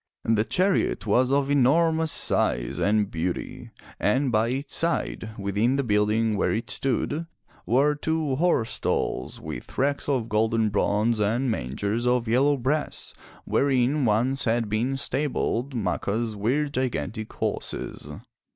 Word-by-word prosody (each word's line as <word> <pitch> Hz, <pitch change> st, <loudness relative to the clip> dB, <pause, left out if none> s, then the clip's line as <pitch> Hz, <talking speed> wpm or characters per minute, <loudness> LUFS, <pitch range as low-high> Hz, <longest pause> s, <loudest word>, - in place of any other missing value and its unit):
The 110 Hz, -1 st, +3 dB
chariot 185 Hz, -, +1 dB
was 125 Hz, +5 st, +2 dB
of 140 Hz, 0 st, +2 dB
enormous 160 Hz, +4 st, +3 dB
size -, -, 0 dB
and 105 Hz, 0 st, +1 dB
beauty, 85 Hz, +2 st, -4 dB, 0.3 s
and 130 Hz, +5 st, +1 dB
by 110 Hz, +1 st, +2 dB
its 135 Hz, +4 st, -3 dB
side, 165 Hz, -9 st, -1 dB
within 100 Hz, +6 st, 0 dB
the 140 Hz, -, 0 dB
building 105 Hz, 0 st, +1 dB
where -, -, +1 dB
it 115 Hz, +1 st, -2 dB
stood, 145 Hz, +5 st, -1 dB, 0.4 s
were 140 Hz, +5 st, +3 dB
two 155 Hz, -1 st, -1 dB
horse 160 Hz, -8 st, +1 dB
stalls -, -, -2 dB
with -, -, -8 dB
racks 140 Hz, +2 st, 0 dB
of 125 Hz, -5 st, 0 dB
golden 110 Hz, 0 st, +1 dB
bronze 105 Hz, +2 st, +1 dB
and 115 Hz, +5 st, +1 dB
mangers 100 Hz, -, -2 dB
of 125 Hz, -1 st, +1 dB
yellow 135 Hz, +5 st, +3 dB
brass, 140 Hz, +5 st, -2 dB, 0.3 s
wherein 135 Hz, +1 st, +2 dB
once 120 Hz, +5 st, +1 dB
had 115 Hz, -1 st, +1 dB
been 120 Hz, +6 st, 0 dB
stabled 135 Hz, -2 st, -2 dB
Macha's 110 Hz, 0 st, -1 dB
weird 140 Hz, +8 st, 0 dB
gigantic 110 Hz, -, -2 dB
horses. -, -, -4 dB
120 Hz, 135 wpm, -25 LUFS, 110-140 Hz, 0.4 s, The